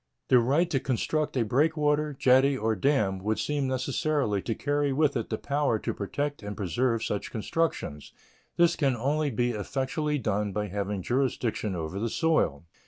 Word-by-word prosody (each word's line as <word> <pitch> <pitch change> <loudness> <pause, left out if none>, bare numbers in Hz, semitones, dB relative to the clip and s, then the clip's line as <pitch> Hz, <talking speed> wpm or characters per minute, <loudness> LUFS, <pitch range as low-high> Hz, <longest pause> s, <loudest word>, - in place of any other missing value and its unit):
The 125 - +7
right 140 +9 +2
to 135 - +2
construct 140 +4 -1
a 120 - +2
breakwater, 150 +4 +2
jetty, 135 +2 +4
or 110 -2 0
dam 105 -5 +1
would 105 +3 -1
seem 145 -2 -1
necessarily 130 - 0
to 115 - -3
carry 145 +2 0
with 145 +1 +2
it 115 -3 -2
the 110 - -1
power 140 -3 0
to - - -3
protect 145 +8 -3
and 105 0 -6
preserve 115 +4 0
such 105 - -3
constructions. 110 - -2 0.5
This 170 0 +4
can 135 -4 +1
only 145 +5 0
be 120 0 0
effectually 135 +7 -2
done 105 -4 -1
by 105 0 -2
having 100 0 -3
jurisdiction 120 -5 -1
over 85 +3 -4
the 115 +2 -1
soil. 135 - +1
130 Hz, 170 wpm, -28 LUFS, 105-145 Hz, 0.5 s, The